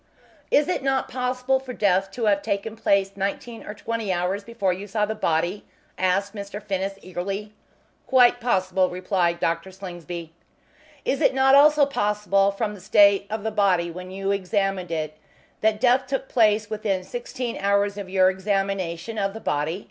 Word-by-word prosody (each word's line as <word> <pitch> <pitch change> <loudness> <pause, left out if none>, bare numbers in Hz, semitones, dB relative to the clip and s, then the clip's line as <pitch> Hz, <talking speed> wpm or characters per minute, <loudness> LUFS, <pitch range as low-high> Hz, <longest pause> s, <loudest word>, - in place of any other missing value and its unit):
"Is 290 0 +3
it 360 - -1
not 270 0 0
possible 255 +1 0
for 260 -1 -8
death 195 -3 +2
to 235 - -2
have 200 -1 +3
taken 200 +3 -3
place 200 -3 +1
nineteen 200 +4 -4
or 210 - -7
twenty 225 -1 -3
hours 185 +3 -1
before 200 -5 -1
you 195 +3 -7
saw 210 +1 0
the 215 - -3
body?" 175 -1 -1 0.3
asked 195 +2 0
Mr. 200 -1 -6
Finnis, 195 -1 -3
eagerly. 195 +3 -5 0.5
"Quite 245 -2 +5
possible," 185 -5 +1
replied 180 -1 0
Dr. 165 +3 -1
Slingsby. 175 -3 -8 0.7
"Is 270 - 0
it - - +3
not 265 0 +4
also 295 +1 +7
possible, 210 -6 +1
from 210 +1 -2
the 200 - -11
state 200 +1 +5
of 215 -1 -4
the 220 - -1
body 185 -5 +2
when 180 +2 -8
you 195 +1 -2
examined 195 -2 -1
it, 155 -2 -3 0.4
that 215 -1 +1
death 250 +2 +3
took 270 0 -2
place 215 -2 +3
within 205 -3 -2
sixteen 240 +3 -5
hours 200 0 +1
of 200 -2 -7
your 185 -1 +4
examination 195 0 -2
of 195 +1 -1
the - - -5
body?" 155 -1 -1
200 Hz, 170 wpm, -24 LUFS, 185-225 Hz, 0.7 s, also